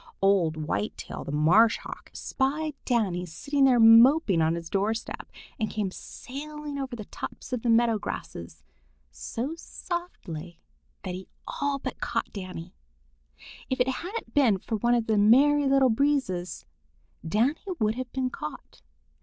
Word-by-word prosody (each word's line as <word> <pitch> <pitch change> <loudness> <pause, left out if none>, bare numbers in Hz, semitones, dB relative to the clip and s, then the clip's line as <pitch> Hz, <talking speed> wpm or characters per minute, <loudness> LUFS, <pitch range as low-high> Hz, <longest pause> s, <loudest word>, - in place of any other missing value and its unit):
Old 190 -5 +3
Whitetail 160 +7 -4
the - - -6
Marsh 180 +10 +5
Hawk, - - -10
spied 295 +3 -1
Danny 205 -8 +1
sitting 275 - 0
there 250 -3 +5
moping 225 - +7
on 160 +1 +2
his 170 -1 -6
door 200 +5 0
step, 225 - -7 0.3
and 220 - 0
came 205 -4 -2
sailing 295 +6 -7
over 265 -2 -4
the 215 -3 -7
tops - - -8
of 250 - -1
the 240 - -1
meadow 230 -1 +4
grasses 80 - -7 0.5
so 250 - -4
softly 180 - -6 0.4
that 185 - -4
he 185 +1 -7 0.2
all 285 -1 -1
but 275 - -6
caught - - -2
Danny. 185 -4 -7 1.0
If 260 - -1
it 250 - +3
hadn't 360 - -5
been 255 -9 +4
for 220 +4 -3
one 240 +3 +2
of 235 -2 +1
the 220 -2 +2
Merry 280 +7 +5
Little 270 -2 +4
Breezes, 225 -9 0 0.6
Danny 225 - +1 0.2
would 215 -1 +2
have 250 +1 -6
been 260 -1 -1
caught. 150 - -8
230 Hz, 150 wpm, -27 LUFS, 185-275 Hz, 1.0 s, moping